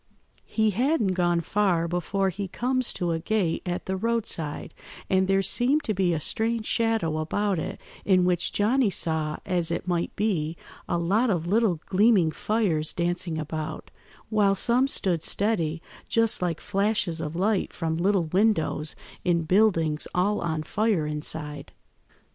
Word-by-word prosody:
"He 220 -1 +1
hadn't 235 - +1
gone 175 -2 +1
far 180 -3 +1
before 190 +3 0
he 195 +2 -4
comes 255 +5 -1
to 175 -1 -1
a 165 - -1
gate 180 -1 0
at 175 0 -3
the 190 - -2
roadside, 205 -8 -2 0.4
and 190 0 +3
there 195 0 +2
seemed 265 +9 +2
to 215 - -1
be 185 -2 +1
a 165 - 0
strange 225 +7 -1
shadow 220 -11 0
about 195 +4 0
it, - - -5 0.2
in 185 -2 +3
which 180 -1 +1
Johnny 230 +3 +2
saw, 160 -4 -1
as 175 -2 0
it 170 - -3
might 175 -1 -1
be, 170 -7 -1 0.3
a - - +1
lot 200 +9 +2
of 170 -5 0
little 200 -2 +2
gleaming 195 -4 +4
fires 180 -7 0
dancing 175 -1 -1
about, 155 0 -5 0.4
while 205 -2 +3
some 245 +6 +2
stood 180 - 0
steady, 170 -7 0 0.3
just 230 -3 +2
like 175 -3 -1
flashes 195 -5 -1
of 155 0 -4
light 195 +2 0
from 160 -1 -2
little 190 +1 +2
windows 160 -4 +1 0.3
in 170 -2 +2
buildings 165 -4 +2
all 200 +4 +1
on 160 -2 -2
fire 205 -1 0
inside. 150 -1 -5
185 Hz, 155 wpm, -26 LUFS, 165-215 Hz, 0.4 s, gleaming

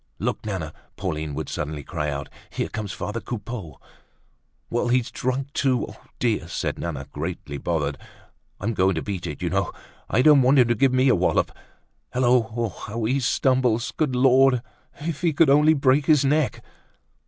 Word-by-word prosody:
"Look, - - -2
Nana," 85 -7 -4 0.2
Pauline 80 -6 -3
would - - -4
suddenly 75 0 -4
cry 75 +2 -3
out, 70 -1 -4 0.2
"here - - -3
comes 105 -2 -4
father 105 +4 -4
Coupeau!" 105 - -6 0.9
"Well, 120 +1 -1
he's 125 -1 +1
drunk 130 +2 -2
too. 130 -4 +1
Oh, - - -12 0.2
dear," 110 -8 0
said 85 - -3
Nana, 75 -4 -4
greatly 75 -2 -5
bothered. 75 -4 -1 0.6
"I'm 110 +4 -1
going 95 -2 +2
to 80 - -2
beat 95 -4 -4
it, 75 - -6
you - - 0
know. - - 0 0.4
I 125 - +3
don't 150 -2 +7
want 130 +3 +4
him 125 -3 +5
to - - +4
give 130 +4 +3
me 130 +1 +3
a - - +6
wallop. 90 -1 +1 0.6
Hullo! 120 -2 +2 0.2
How 115 +2 -4
he 130 +5 +1
stumbles! 125 -2 +1
Good 150 -5 -1
Lord, 130 -1 +4 0.4
if 155 -1 -4
he 170 -3 +2
could 145 0 +4
only 150 +2 +5
break 135 0 +3
his 150 -3 +5
neck!" 150 0 +1
120 Hz, 175 wpm, -24 LUFS, 90-135 Hz, 0.9 s, don't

